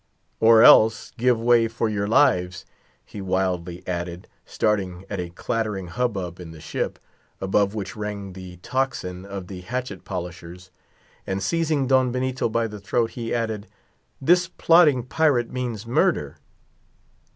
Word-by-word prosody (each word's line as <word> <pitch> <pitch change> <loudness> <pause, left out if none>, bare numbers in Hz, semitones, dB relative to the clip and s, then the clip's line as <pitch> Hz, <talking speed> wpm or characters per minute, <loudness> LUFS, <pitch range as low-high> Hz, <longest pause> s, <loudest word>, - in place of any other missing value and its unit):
"Or 115 0 +7
else—give 115 +2 +5
way 115 0 +4
for 115 0 -2
your 100 -2 -1
lives," 90 -8 +2 0.4
he 100 - -9
wildly 90 -2 -2
added, 85 0 -4 0.2
starting 95 -4 -1
at 100 - -3
a 90 -1 -4
clattering 100 0 -3
hubbub 95 -5 -3
in 90 -2 -9
the 80 -1 -11
ship, - - -3 0.4
above 100 +2 +1
which 100 -3 -5
rang 105 -2 -5
the 90 -1 -10
tocsin 100 -9 -2
of 100 -2 -6
the 90 0 -8
hatchet 110 0 -5
polishers; 90 0 -7 0.6
and 95 0 -2
seizing 155 - 0
Don 130 -1 +3
Benito 130 -1 -1
by 115 +1 0
the 105 -2 -7
throat 115 +3 0
he 115 -2 -5
added, 110 -3 -2 0.5
"this 175 +5 +3
plotting 165 -7 +4
pirate 130 -2 +1
means 120 -4 -4
murder!" 115 - +1
105 Hz, 140 wpm, -23 LUFS, 90-125 Hz, 0.6 s, Or